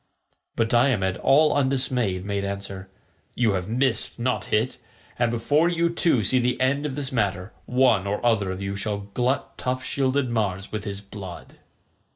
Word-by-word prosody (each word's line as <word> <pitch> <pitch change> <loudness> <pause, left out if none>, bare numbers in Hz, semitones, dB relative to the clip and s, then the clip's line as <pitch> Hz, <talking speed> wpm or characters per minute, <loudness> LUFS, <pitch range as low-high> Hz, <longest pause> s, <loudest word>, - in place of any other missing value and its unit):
But 115 - +1
Diomed 115 -6 +2
all 150 +3 +4
undismayed 130 -8 0
made 100 -1 -2
answer, 100 -1 -5 0.5
"You 115 -3 +2
have 95 0 -2
missed, 125 -1 +1
not 120 -4 -1
hit, 110 +4 0 0.4
and 120 -1 +3
before 145 +8 +2
you 170 -1 +1
two 165 -9 +2
see 130 +5 +3
the 125 0 0
end 140 +3 +1
of 135 - -5
this 140 -2 -3
matter 100 -4 -1
one 125 -6 +3
or 105 +1 -1
other 105 -5 +2
of 95 +1 -4
you 100 0 -3
shall 100 0 -4
glut 125 +4 -1
tough 130 0 -2
shielded 135 0 0
Mars 100 -4 -1
with 105 -1 -4
his 100 -1 -3
blood." 100 -3 -10
115 Hz, 170 wpm, -24 LUFS, 100-130 Hz, 0.5 s, all